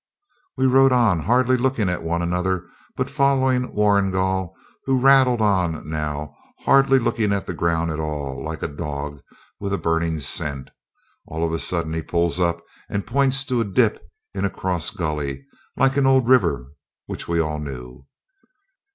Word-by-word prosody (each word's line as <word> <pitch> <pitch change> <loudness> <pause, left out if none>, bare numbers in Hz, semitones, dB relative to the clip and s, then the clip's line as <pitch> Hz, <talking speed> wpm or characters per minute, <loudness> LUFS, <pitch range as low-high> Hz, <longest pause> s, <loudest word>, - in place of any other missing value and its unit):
We 130 - +2
rode 135 +1 +5
on, 115 -8 +3
hardly 125 +8 +2
looking 125 -4 0
at 90 0 -2
one 85 +1 -1
another, 90 +1 -1 0.3
but - - -1
following 130 -2 +1
Warrigal, 95 -3 +1 0.3
who 135 -1 +2
rattled 130 -3 +5
on 90 -7 0
now, 75 -1 -4 0.3
hardly 135 0 +5
looking 115 -4 0
at 100 -1 -1
the 90 - -4
ground 85 -1 0
at 80 - -4
all, 70 -3 -4
like 80 +1 -5
a - - 0
dog 75 -1 -6 0.4
with 100 -1 -3
a - - +1
burning 80 -1 0
scent. 70 -1 -3 0.6
All 80 +1 -2
of 80 - -2
a 80 - -1
sudden 85 -3 -1
he 80 - -2
pulls 85 +2 0
up, 85 -1 0 0.3
and 100 -2 -3
points 135 0 +2
to 125 -4 0
a - - +2
dip 100 -4 +1 0.3
into 100 0 0
a - - -7
cross 90 -3 -2
gully, 75 -5 -4 0.3
like 135 +1 +2
an 135 -1 +3
old 130 -2 +4
river, 85 - +2 0.3
which - - -6
we 85 0 0
all 75 -1 -1
knew. 65 -2 -8
90 Hz, 170 wpm, -22 LUFS, 80-125 Hz, 0.6 s, rode